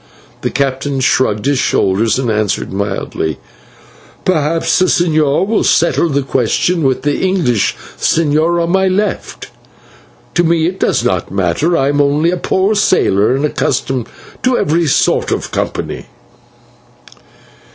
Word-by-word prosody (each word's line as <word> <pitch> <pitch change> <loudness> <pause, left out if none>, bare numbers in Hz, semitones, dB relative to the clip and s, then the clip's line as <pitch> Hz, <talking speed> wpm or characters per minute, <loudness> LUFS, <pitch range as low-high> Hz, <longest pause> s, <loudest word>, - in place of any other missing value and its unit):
The - - -1
captain 135 0 -2
shrugged 130 -5 +1
his 140 -2 +1
shoulders 105 +2 +1
and 125 -3 -1
answered 105 -3 -1
mildly: 95 -6 -3 0.9
"Perhaps 165 -2 +1
the 185 - +4
señor 155 -3 +2
will 220 +2 0
settle 170 0 +2
the 140 -1 0
question 135 +7 0
with 135 -3 0
the 145 -1 0
English 175 - +1 0.2
señor 165 +2 +1
on 170 - -1
my 190 0 +2
left. 195 +2 -2 0.8
To 175 - +2
me 165 -1 +2
it 185 +3 -3
does - - +1
not - - -1
matter; 100 - 0
I 135 +1 +1
am 145 0 +2
only 145 +4 +2
a 180 - -1
poor 190 +4 0
sailor, 130 - +2
and 140 +2 0
accustomed 130 -4 -1 0.3
to 255 0 +1
every 165 +2 +1
sort 135 - +1
of - - -3
company." - - -4
145 Hz, 140 wpm, -14 LUFS, 130-175 Hz, 0.9 s, the